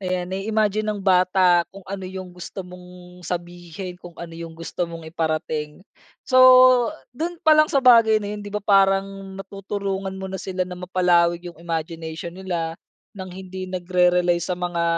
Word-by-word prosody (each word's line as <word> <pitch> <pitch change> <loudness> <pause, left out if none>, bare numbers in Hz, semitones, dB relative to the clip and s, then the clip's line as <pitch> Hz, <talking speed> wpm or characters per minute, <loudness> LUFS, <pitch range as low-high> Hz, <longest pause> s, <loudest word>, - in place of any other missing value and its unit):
Ayan, 180 -1 -2
nai-imagine 210 +2 0
ng 205 - -6
bata 185 -2 +4
kung 195 - -11
ano 195 -1 -5
yung 185 0 -7
gusto 180 +2 -8
mong 180 0 -13
sabihin, 175 +1 -6
kung 175 -1 -12
ano 165 -1 -8
yung 165 0 -7
gusto 165 +2 -4
mong 165 -1 -9
iparating. 155 -1 -3 0.4
So, 255 - -1 0.8
do'n 335 +3 -4
pa 310 -1 +5
lang 305 - +7
sa 275 - +3
bagay 230 -4 +6
na 205 - -5
yun 205 - -8
di 205 - -8
ba 210 - -2
parang 195 -1 +3 0.3
natutulungan 195 -1 -4
mo 190 - -5
na 190 - -5
sila 185 -1 -3
na 180 - -7
mapalawig 175 -1 +1
yung 170 - -12
imagination 165 0 -5
nila 170 -4 -3 0.4
ng 190 -1 -7
hindi 185 0 -7
nagre-rely 180 -1 +2
sa 170 +2 -3
mga 175 -1 -2
180 Hz, 165 wpm, -22 LUFS, 175-195 Hz, 0.8 s, lang